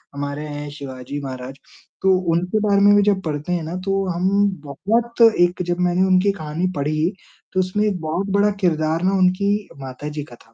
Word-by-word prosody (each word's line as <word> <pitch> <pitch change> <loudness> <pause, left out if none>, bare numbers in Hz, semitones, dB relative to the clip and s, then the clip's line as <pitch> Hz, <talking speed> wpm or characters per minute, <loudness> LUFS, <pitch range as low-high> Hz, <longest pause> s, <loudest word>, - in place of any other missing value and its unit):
हमारे 145 +1 -4
हैं 145 0 -6
शिवाजी 140 -1 -7
महाराज, 130 0 -6 0.5
तो 190 -1 +4 0.2
उनके 180 +5 0
बारे 200 -1 +3
में 205 0 +6
भी 205 - +5
जब 200 -2 +2
पढ़ते 150 +1 -3
हैं 175 -2 -1
ना, 160 +3 -5
तो 195 +1 -1
हम 175 +1 0 0.4
बहुत 230 - -1 0.2
एक 175 +1 +3
जब 175 0 -2
मैंने 180 +1 +2
उनकी 190 +2 +4
कहानी 160 -1 -3
पढ़ी 155 +4 0 0.4
तो 185 - +1
उसमें 185 +3 0
एक 195 -3 -1
बहुत 165 +5 -2
बड़ा 205 +1 +3
किरदार 160 -2 +1
ना 190 +1 +2
उनकी 200 +3 +1
माता 135 +2 -7
जी 150 0 -5
का 125 -4 -13
था। 115 - -27
175 Hz, 195 wpm, -21 LUFS, 150-195 Hz, 0.5 s, में